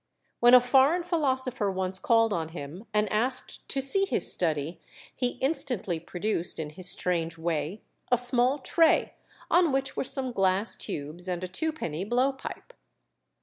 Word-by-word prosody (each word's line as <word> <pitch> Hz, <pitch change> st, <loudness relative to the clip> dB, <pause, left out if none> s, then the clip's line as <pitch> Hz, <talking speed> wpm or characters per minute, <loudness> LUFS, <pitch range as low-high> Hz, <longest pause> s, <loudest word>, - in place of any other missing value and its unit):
When 240 Hz, +1 st, +6 dB
a -, -, +9 dB
foreign 270 Hz, +7 st, +3 dB
philosopher 260 Hz, -, -1 dB
once 190 Hz, 0 st, -2 dB
called 225 Hz, -1 st, +2 dB
on 160 Hz, -3 st, -3 dB
him 160 Hz, +5 st, -9 dB
and 210 Hz, 0 st, +1 dB
asked 250 Hz, +4 st, -2 dB
to 275 Hz, -, -1 dB
see 390 Hz, +9 st, +1 dB
his -, -, +1 dB
study, 160 Hz, -1 st, -2 dB, 0.3 s
he 250 Hz, -1 st, -2 dB
instantly 250 Hz, -, +1 dB
produced, 175 Hz, +1 st, +1 dB
in 150 Hz, -2 st, -5 dB
his 180 Hz, +3 st, +5 dB
strange 170 Hz, -3 st, +2 dB
way, 160 Hz, +3 st, -4 dB, 0.3 s
a 245 Hz, -, +4 dB
small 245 Hz, +2 st, +3 dB
tray, 325 Hz, +4 st, +2 dB, 0.4 s
on 345 Hz, -3 st, +3 dB
which 270 Hz, 0 st, -2 dB
were -, -, -2 dB
some 260 Hz, -1 st, -2 dB
glass 195 Hz, 0 st, +1 dB
tubes 170 Hz, -1 st, -5 dB
and 180 Hz, -1 st, -4 dB
a -, -, -3 dB
twopenny 190 Hz, -, -4 dB
blow 245 Hz, +6 st, +1 dB
pipe. 270 Hz, -, -10 dB
215 Hz, 155 wpm, -27 LUFS, 175-265 Hz, 0.4 s, a